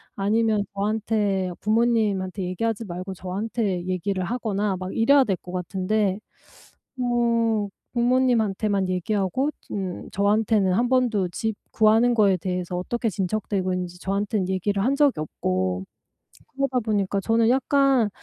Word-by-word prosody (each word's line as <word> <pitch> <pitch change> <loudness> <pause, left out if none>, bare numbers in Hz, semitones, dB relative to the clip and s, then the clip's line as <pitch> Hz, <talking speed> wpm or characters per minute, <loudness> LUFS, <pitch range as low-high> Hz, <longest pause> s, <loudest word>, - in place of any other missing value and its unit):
아니면 215 +1 +1
저한테 205 -2 0
부모님한테 210 -4 +1
얘기하지 225 +5 -2
말고 185 +1 -6
저한테 190 0 -2
얘기를 185 +1 -1
하거나 210 -3 -1
막 185 +1 -6
이래야 270 +4 +5
될 195 -5 0
것 180 - -11
같은데 190 +2 -1 0.8
뭐 230 -4 +1 0.3
부모님한테만 225 -6 +2
얘기하고 195 - 0 0.2
음 190 -3 -4
저한테는 205 -1 +2
1 240 +4 +2
번도 235 -8 +2
집 220 +2 -3 0.2
구하는 225 +2 +4
거에 200 -4 +4
대해서 180 0 -3
어떻게 235 +5 -2
진척되고 190 0 -1
있는지 180 -1 -4
저한테는 200 0 -1
얘기를 195 +1 0
한 270 - +2
적이 285 - +3
없고. 95 -10 -2 0.7
그러다 270 -2 0
보니까 200 -3 0
저는 225 +3 +2
약간 270 -2 +3
205 Hz, 310 characters per minute, -24 LUFS, 185-230 Hz, 0.8 s, 이래야